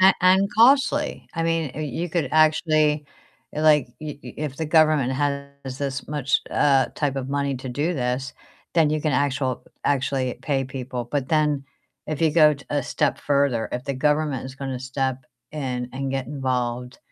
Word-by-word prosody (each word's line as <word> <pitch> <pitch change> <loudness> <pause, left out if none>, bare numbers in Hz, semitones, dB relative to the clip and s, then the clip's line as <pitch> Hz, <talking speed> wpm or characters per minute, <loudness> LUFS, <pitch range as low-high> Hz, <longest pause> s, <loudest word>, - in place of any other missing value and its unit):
A 190 0 +8
and 190 +2 +5
costly, 280 +5 +3
I 165 - -1
mean, 165 -4 0
y 155 - -5
you 160 +5 -3
could 160 -5 -1
actually, 155 -1 +3 0.5
like 150 -2 +4
y 150 -2 -6
y - - -9
if 145 -3 -4
the 160 - -3
government 155 -5 +4
has 140 -1 -3
this 140 -1 -3
much, 145 -3 +1
uh, 135 -3 +3
type 140 -2 -1
of 135 0 -3
money 140 0 -1
to 130 +1 -7
do 150 +8 -1
this, 125 0 -2 0.4
then 160 -3 +4
you 155 - 0
can 150 -2 0
actual 135 -2 0 0.2
actually 130 -2 0
pay 135 -2 0
people, 130 -1 -5
but 140 -3 -1
then 150 -3 +1 0.4
if 155 -1 -4
you 160 -2 +4
go 155 -1 +5 0.2
a 145 -1 0
step 130 +2 0
further, 140 -6 +1
if 125 +1 -3
the 140 - -2
government 150 -1 0
is 130 - -8
gonna 135 -2 -4
step 130 -1 -2 0.3
in 125 -4 -3
and 135 0 -3
get 135 -2 -2
involved 125 -3 -2
140 Hz, 175 wpm, -23 LUFS, 130-155 Hz, 0.5 s, A